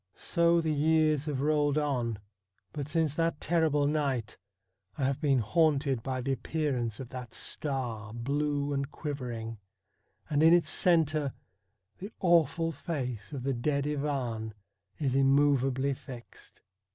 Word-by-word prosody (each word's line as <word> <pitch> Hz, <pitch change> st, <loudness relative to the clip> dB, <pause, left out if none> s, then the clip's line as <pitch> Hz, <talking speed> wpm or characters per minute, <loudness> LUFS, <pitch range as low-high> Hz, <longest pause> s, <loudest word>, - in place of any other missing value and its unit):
So 170 Hz, -1 st, +2 dB
the 160 Hz, -1 st, 0 dB
years 155 Hz, -1 st, +2 dB
have 145 Hz, -4 st, -2 dB
rolled 145 Hz, -1 st, +2 dB
on, 125 Hz, -7 st, 0 dB, 0.6 s
but 145 Hz, -3 st, -4 dB
since 160 Hz, -2 st, +1 dB
that 165 Hz, -1 st, 0 dB
terrible 155 Hz, -3 st, +2 dB
night 140 Hz, -7 st, -1 dB, 0.6 s
I -, -, -2 dB
have 135 Hz, +2 st, 0 dB
been 140 Hz, -4 st, +3 dB
haunted 140 Hz, +1 st, +2 dB
by 130 Hz, +1 st, -3 dB
the 135 Hz, +2 st, -1 dB
appearance 130 Hz, -6 st, -2 dB
of 130 Hz, -3 st, -7 dB
that 125 Hz, -3 st, -8 dB
star, 120 Hz, -7 st, -3 dB
blue 145 Hz, +4 st, -1 dB
and 140 Hz, 0 st, -2 dB
quivering, 120 Hz, -8 st, -5 dB, 0.7 s
and 145 Hz, 0 st, +1 dB
in 165 Hz, +2 st, +7 dB
its 170 Hz, -3 st, +2 dB
centre 155 Hz, -5 st, +2 dB, 0.7 s
the 200 Hz, +4 st, -7 dB
awful 165 Hz, -2 st, +3 dB
face 125 Hz, -, -4 dB
of 135 Hz, -4 st, -5 dB
the 135 Hz, +1 st, 0 dB
dead 140 Hz, +3 st, 0 dB
Ivan 135 Hz, -7 st, -2 dB, 0.4 s
is 135 Hz, -4 st, 0 dB
immovably 135 Hz, 0 st, +3 dB
fixed. 130 Hz, -3 st, -11 dB
140 Hz, 135 wpm, -30 LUFS, 130-155 Hz, 0.7 s, in